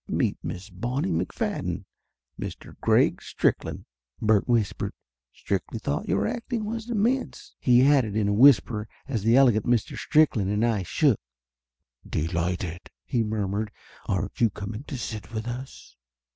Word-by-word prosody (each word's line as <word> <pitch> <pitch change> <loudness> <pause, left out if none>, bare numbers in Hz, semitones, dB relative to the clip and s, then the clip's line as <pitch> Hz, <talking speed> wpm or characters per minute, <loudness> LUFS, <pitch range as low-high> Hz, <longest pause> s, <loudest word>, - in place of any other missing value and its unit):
"Meet - - 0
Miss 95 +3 -6
Bonnie 120 +6 -2
McFadden, 85 +3 -2 0.5
Mr. - - -7
Greg - - +3
Strick - - 0
land," - - -7 0.3
Bert 110 -2 +3
whispered. 115 -5 0 0.4
"Stricky 100 - -3
thought 145 - -2
your - - +2
acting 235 -1 -3
was 225 +2 -4
immense," 240 +4 -1
he 125 0 +5
added 130 -8 +3
in 105 -2 +1
a 100 - +2
whisper 115 -3 +5 0.2
as 120 -6 -1
the 115 +3 +4
elegant 120 -6 +5
Mr. 120 -3 +1
Strickland 130 -11 +3
and 105 +3 +2
I 110 -4 +1
shook. 120 - +2 0.9
"Delighted 85 +2 -2
!" - - -66
he 120 - +2
murmured. 105 -1 -2 0.4
"Aren't 100 +3 -2
you 115 - +5
coming 105 +6 -7
to 140 - -5
sit 110 -3 -6
with 110 0 -4
us?" 125 - -7
110 Hz, 145 wpm, -26 LUFS, 100-135 Hz, 0.9 s, he